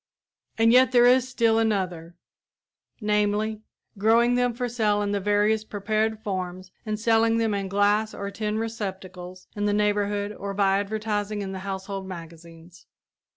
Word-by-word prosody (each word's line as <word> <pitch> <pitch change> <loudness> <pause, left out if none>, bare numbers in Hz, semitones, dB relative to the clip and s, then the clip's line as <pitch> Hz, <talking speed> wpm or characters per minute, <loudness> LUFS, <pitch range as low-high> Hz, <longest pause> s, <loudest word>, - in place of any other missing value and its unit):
And 225 +1 +4
yet 255 +1 +5
there 240 -1 +6
is 255 +1 +4
still 230 -3 +2
another; 180 -6 -1 0.9
namely, 210 +1 0 0.4
growing 230 +3 +4
them 245 0 +2
for 245 +1 -3
sale 215 -3 +1
in 200 - -1
the 205 - 0
various 210 +2 +2
prepared 215 +1 -2
forms 185 -2 -4 0.2
and 215 0 -2
selling 225 0 +3
them 225 -2 +1
in 200 -1 -2
glass 205 +2 +2
or 200 0 -6
tin 215 0 -3
receptacles 190 -5 -6
in 205 0 -1
the 205 - +1
neighborhood 205 0 0
or 200 -1 -6
by 195 -1 +3
advertising 210 0 -2
in 190 - -5
the 190 - -5
household 195 0 -5
magazines. 170 -1 -11
205 Hz, 155 wpm, -25 LUFS, 195-220 Hz, 0.9 s, there